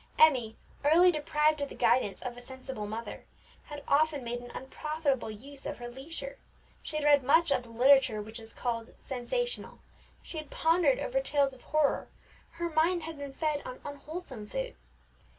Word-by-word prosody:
Emmie, 255 -8 +5 0.3
early 340 +5 +7
deprived 300 -1 +2
of 285 - -2
the - - -9
guidance 225 -5 +2
of 245 -1 -4
a 245 - -10
sensible 260 -4 -6
mother, 225 +2 -6 0.4
had 290 -1 -8
often 295 -1 +3
made 240 0 -3
an 245 0 -10
unprofitable 280 -1 -2
use 270 +6 -9
of 295 - -4
her 240 - -6
leisure; 330 - -7 0.4
she - - -7
had 305 -1 0
read 290 -1 +6
much 320 +5 +4
of 250 - +3
the 240 - -15
literature 250 -1 +5
which 220 +2 -7
is 225 0 -8
called 230 -2 -3
sensational; 485 - -3 0.5
she 320 - -6
had 305 -2 -8
pondered 350 +10 +3
over - - 0
tales 285 - +2
of 260 - -15
horror; 305 -2 +2 0.5
her 340 +1 -2
mind 325 +2 +2
had 320 -2 -7
been 280 -1 -5
fed 300 0 -1
on 255 - -7
unwholesome 285 -5 -7
food. - - -4
285 Hz, 175 wpm, -30 LUFS, 245-315 Hz, 0.5 s, early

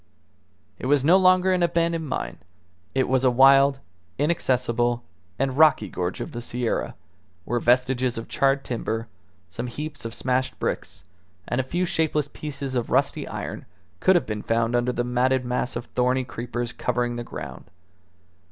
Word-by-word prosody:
It - - -4
was 140 -1 +3
no 170 +4 +6
longer 185 0 +5
an 180 - +1
abandoned 170 -2 +1
mine; 65 - -4 0.6
it 130 - +2
was 130 0 +2
a 130 - +5
wild, 135 +2 +6 0.4
inaccessible, 120 -6 +1 0.3
and 135 -1 0
rocky 155 -2 +5
gorge 90 +1 -3
of - - -5
the 120 - -5
Sierra, 120 0 -2 0.5
where 120 +1 0
vestiges 125 0 +2
of 115 - -5
charred 135 0 +1
timber, 115 -1 -3 0.4
some 90 +8 -5
heaps 145 +4 -6
of 115 0 -5
smashed 130 +1 -1
bricks, - - -4 0.4
and 125 - 0
a - - -6
few 175 +8 -1
shapeless 155 -4 0
pieces 140 -3 -5
of 120 -3 -1
rusty - - +1
iron - - -6 0.3
could 190 - +4
have 175 - +2
been 105 -1 -4
found 115 +2 0
under 120 +1 +1
the 120 - -1
matted 125 +1 +1
mass 125 +1 -2
of 120 0 -4
thorny 125 +1 +1
creepers 120 -1 -5
covering 120 -1 -1
the 120 - -4
ground. 75 - -8
125 Hz, 160 wpm, -24 LUFS, 120-140 Hz, 0.6 s, no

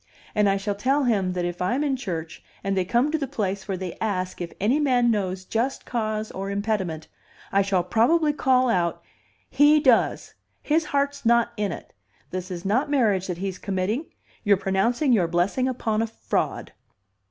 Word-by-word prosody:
And 210 -1 +3
I 195 - +2
shall 200 +1 -2
tell 265 +8 +1
him 200 -7 +1
that 180 -1 -2
if 175 0 -4
I'm 245 +11 +1
in 280 -2 +1
church 170 -9 -5 0.2
and 195 0 0
they 190 - +2
come 240 +9 +2
to 320 - 0
the 275 - -2
place 200 -7 -3
where 195 -2 -2
they 180 -2 -6
ask 185 -4 -2
if 170 - -4
any 235 +9 +2
man 250 -5 +3
knows 190 -3 -2
just 245 +7 -2
cause 215 -2 -2
or 195 +1 -5
impediment, 200 -6 -2 0.4
I 200 - +4
shall 195 -2 +1
probably 295 - +3
call 255 -3 +3
out, 175 -7 0 0.5
'He 290 +3 +5
does! 260 -6 +2 0.3
His 310 +1 +1
heart's 280 -1 -1
not 235 0 +3
in 210 -3 -1
it. - - -9 0.4
This 185 0 -4
is 180 -1 -6
not 250 +9 +1
marriage 215 -10 +2
that 180 -2 -3
he's 190 0 -4
committing. 200 - -2 0.4
You're 205 -3 +4
pronouncing 230 +8 +1
your 185 -7 +3
blessing 180 +10 +1
upon 225 -4 -1
a 225 - 0
fraud. 225 - -3
210 Hz, 185 wpm, -24 LUFS, 185-255 Hz, 0.5 s, He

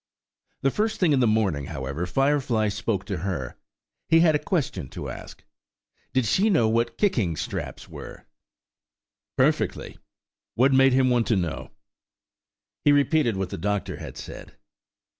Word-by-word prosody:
The 135 - +3
first 220 +5 -1
thing 180 -5 +3
in 140 - +3
the 125 - +3
morning, 100 -10 +1
however, 70 +3 -4
Firefly 130 -3 +1
spoke 100 -1 -2
to 100 -4 -3
her. 80 -8 -4 0.5
He 165 0 +6
had 165 -2 +5
a 150 - +2
question 130 - -2
to - - -6
ask. - - -10 0.7
Did 130 -2 +1
she 195 - +2
know 140 - +3
what 115 +1 0
kicking 115 - +1
straps - - -5
were? - - -10 1.1
Perfectly; - - 0 0.6
what 135 +3 +4
made 135 0 +5
him 130 -1 +3
want 120 -2 +2
to 115 - +3
know. 85 -4 -3 1.1
He 145 - +5
repeated 145 -5 +2
what 95 -2 -3
the - - -5
doctor 105 +3 -2
had - - -9
said. - - -10
115 Hz, 150 wpm, -25 LUFS, 95-145 Hz, 1.1 s, He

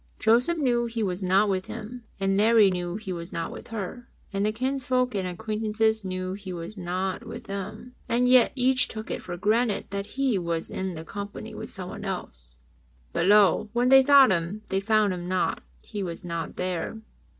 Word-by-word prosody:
Joseph 245 +10 +3
knew 240 -5 +1
He 230 -1 -2
was 185 -1 -2
not 190 +3 +3
with 190 -1 -1
him, 230 +2 -8
and 195 0 +1
Mary 215 -1 +5
knew 175 -1 -3
He 205 -3 -5
was 170 +1 -7
not 165 -1 -3
with - - -9
her, 225 +2 -6 0.2
and 195 0 0
the 215 - +2
kinsfolks 255 0 0
and 190 -2 -1
acquaintances 220 +3 0
knew 185 0 -3
He 195 -1 -7
was 175 +3 -6
not 185 0 -3
with - - -8
them, 205 +5 -6 0.2
and 245 +2 +2
yet 250 -1 +6
each 255 0 +3
took 220 0 -7
it - - -3
for 175 - -6
granted 215 +3 +1
that 200 0 -3
He 265 -7 +2
was 170 -2 -3
in 190 -2 -3
the 160 0 -7
company 200 +2 -7
with - - -6
someone - - -7
else. - - -6 0.6
But - - +1
lo! 210 +1 +5
when 245 +1 +2
they 265 0 +8
sought 275 -4 +7
Him, 185 +4 -1
they 190 - +1
found 210 -1 +2
Him 175 -1 -5
not; 185 0 0 0.2
He 205 - -5
was 175 -1 -5
not 170 -2 -4
there. 180 +3 -2
205 Hz, 195 wpm, -26 LUFS, 185-230 Hz, 0.6 s, they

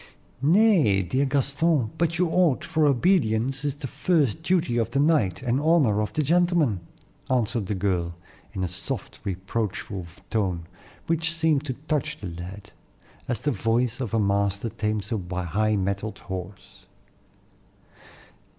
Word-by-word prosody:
"Nay, 160 - +4
dear 130 +10 0
Gaston, 140 -1 +1
but 170 0 +1
you 180 +1 +2
ought, 165 -5 +2
for 155 -2 +2
obedience 135 - +2
is 145 -1 -1
the 145 -1 -7
first 155 -1 +1
duty 160 -9 +1
of 115 - 0
the 140 - 0
knight, 140 - +2
and 125 +2 +1
honor 145 -10 +3
of 105 - -2
the 155 - +1
gentleman," 170 - +2 0.5
answered 115 -4 0
the 105 - -1
girl, 90 -3 -1 0.4
in 95 -2 -3
a - - 0
soft, 90 0 -5
reproachful 95 0 -3 0.2
tone, 90 -6 -1 0.4
which 165 0 +1
seemed 160 -3 +1
to 130 - -2
touch 150 0 -1
the - - -7
lad, 90 +3 -8 0.6
as 120 -2 -2
the 145 - +1
voice 115 +2 0
of 125 -5 -3
a - - +3
master 100 +1 +1
tames 105 0 -3
a 90 -4 -2
high 110 +5 +1
mettled 100 +2 -2
horse. 95 +1 -8
115 Hz, 145 wpm, -25 LUFS, 100-150 Hz, 0.6 s, Nay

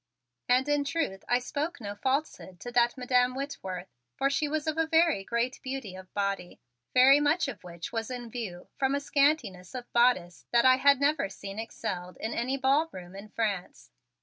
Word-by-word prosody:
And 255 +2 +4
in 290 -1 +2
truth 280 -9 -2
I 245 - +5
spoke 290 +6 -3
no 205 -3 -5
falsehood 260 - -2
to 245 - -6
that 240 +1 +3
Madam 250 0 +2
Whitworth, 190 - -5 0.2
for 275 0 +2
she 300 +2 +1
was 300 0 -2
of 315 -1 0
a 325 - +2
very 325 - +3
great 235 +4 -1
beauty 260 -7 -5
of 185 0 -11
body, 200 -3 -2 0.3
very 265 +3 +7
much 295 +3 +2
of 245 -8 -7
which 170 -1 -7
was 225 -1 -3
in 245 -2 -6
view 200 -8 -6
from 270 0 +2
a - - +1
scantiness 280 - +1
of 245 -1 -7
bodice 235 -8 +2
that 235 0 +4
I 255 0 +7
had 280 0 +5
never 285 -7 +2
seen 195 +1 -7
excelled 180 -5 -5
in 225 - -3
any 255 +3 -1
ballroom 265 - 0
in 200 +2 -9
France. 200 - -3
245 Hz, 185 wpm, -29 LUFS, 200-280 Hz, 0.3 s, very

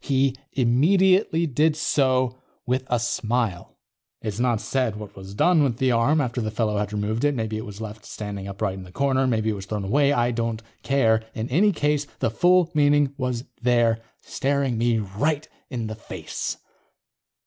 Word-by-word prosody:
He 135 -1 +1 0.2
immediately 170 - +3
did 150 +2 +2
so, 130 -5 +1 0.3
with 130 +1 0
a 120 - +1
smile._ 115 -4 -2 0.4
It's 105 -1 -4
not 120 -3 +2
said 125 -4 -1
what 105 -1 -9
was 95 +1 -10
done 175 - +4
with 125 -5 0
the 130 0 +2
arm 120 +7 +3
after 125 -3 -1
the 110 - -2
fellow 105 -1 -1
had 105 -1 -2
removed 105 +3 -2
it. 145 -1 +2
Maybe 110 -2 -2
it 110 - -6
was 105 +1 -9
left 110 -1 -7
standing 100 -2 -6
upright 100 -1 -2
in 95 0 -8
the 90 - -13
corner. 135 +3 +1
Maybe 110 -3 +1
it - - -2
was 100 -1 -8
thrown 105 -2 -3
away. 140 +7 +3
I 120 -3 +2
don't 115 -1 -2 0.2
care. 115 -5 +2
In 110 +1 -3
any 195 +10 +4
case, 150 -4 0
the 115 - 0
full 175 +6 +3
meaning 145 -2 +3
was 125 -3 -2 0.2
there, 120 -2 +3 0.2
staring 140 -2 -1
me 120 -1 +2
right 115 +10 -1 0.2
in 120 -4 -3
the 110 - -4
face. 110 - -5
120 Hz, 180 wpm, -24 LUFS, 110-140 Hz, 0.4 s, done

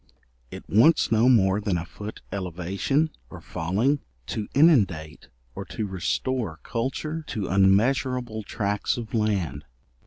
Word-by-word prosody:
It - - -10
wants 120 - +4
no 115 +3 +4
more 100 -4 +4
than 100 -4 0
a 85 - -4
foot 105 +4 -9
elevation, 95 - -1 0.2
or - - -10
falling, 105 - 0 0.3
to 105 - -4
inundate 100 - +3 0.3
or - - -6
to 110 - -4
restore 100 0 -2
culture 145 +7 -3
to 100 -4 -3
unmeasurable 110 +4 +2
tracts 105 +1 -2
of 115 -2 -7
land. 100 -10 0
105 Hz, 125 wpm, -25 LUFS, 95-125 Hz, 0.3 s, wants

